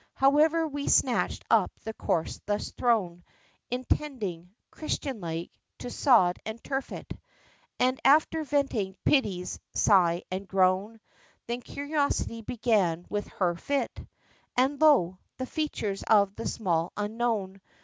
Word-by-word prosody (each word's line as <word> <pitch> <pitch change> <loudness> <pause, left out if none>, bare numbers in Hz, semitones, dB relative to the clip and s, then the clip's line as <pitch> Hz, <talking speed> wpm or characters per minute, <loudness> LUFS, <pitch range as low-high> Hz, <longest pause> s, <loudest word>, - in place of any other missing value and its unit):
However, 310 +4 +4
we 285 -1 -5
snatched - - +2
up - - +4
the 220 - -5
corse 165 -6 -2
thus 205 0 -2
thrown, 190 -8 0 0.5
Intending, 245 - -3 0.2
Christian 275 -6 -4
like, 165 0 -4 0.3
to 245 - -7
sod 205 -11 +4
and 220 +1 -6
turf 270 -1 -3
it, - - -7 0.7
And 255 +1 +2
after 310 +2 +4
venting 275 -10 -1
Pity's 190 -10 +1 0.2
sigh 175 -3 +4
and 190 +1 -4
groan, 190 +4 +1 0.4
Then 240 +1 -3
curiosity 285 -4 -2
began 210 -7 0
with 205 -1 -2
her 180 -3 0
fit; 280 +11 -1 0.7
And 270 +4 +2
lo! 190 - +4 0.2
the 260 - -3
features 225 -9 -3
of 200 -3 +4
the 230 - -4
Small 170 -6 -1
Unknown! 210 -2 -2
220 Hz, 125 wpm, -28 LUFS, 185-270 Hz, 0.7 s, However